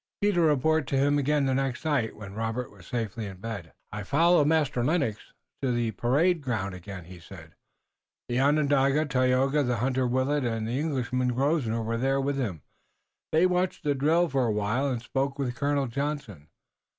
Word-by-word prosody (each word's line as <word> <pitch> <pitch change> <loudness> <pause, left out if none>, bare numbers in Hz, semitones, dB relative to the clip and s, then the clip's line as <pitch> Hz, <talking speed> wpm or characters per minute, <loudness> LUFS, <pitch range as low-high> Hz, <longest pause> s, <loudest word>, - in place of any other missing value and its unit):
Peter 200 -4 +2
reported 155 -1 +2
to 135 - 0
him 145 +2 +3
again 145 0 +1
the 135 - +1
next 135 +1 -2
night, 140 -8 0
when 100 -2 -9
Robert 115 +3 -3
was - - -16
safely 115 -2 -3
in 95 -1 -9
bed. 100 -5 -6 0.2
"I 105 0 -5
followed 155 - +3
Master 150 -6 +1
Lennox 140 -7 0 0.4
to 130 - 0
the 120 -2 0
parade 150 +10 +2
ground 110 -8 -2
again," 95 0 -8
he 90 +1 -12
said. 85 -2 -13 0.7
"The 120 +1 0
Onondaga, 140 0 +3
Tayoga, 130 +1 +2
the 125 -3 0
hunter, 130 +2 0
Willet, 130 +3 +1
and 115 -2 -2
the 120 +4 -1
Englishman, 125 -4 -1
Grosvenor, 130 -5 0
were 125 +5 0
with 140 +1 -1
him. 95 - -3 0.7
They 160 +3 +4
watched 180 0 0
the 145 - +2
drill 160 +6 +2
for 135 -5 +1
a - - +1
while, 110 +7 0
and 120 -3 -3
spoke 135 +3 -2
with 130 -3 -2
Colonel 140 +2 0
Johnson. 135 - -4
130 Hz, 175 wpm, -27 LUFS, 115-145 Hz, 0.7 s, They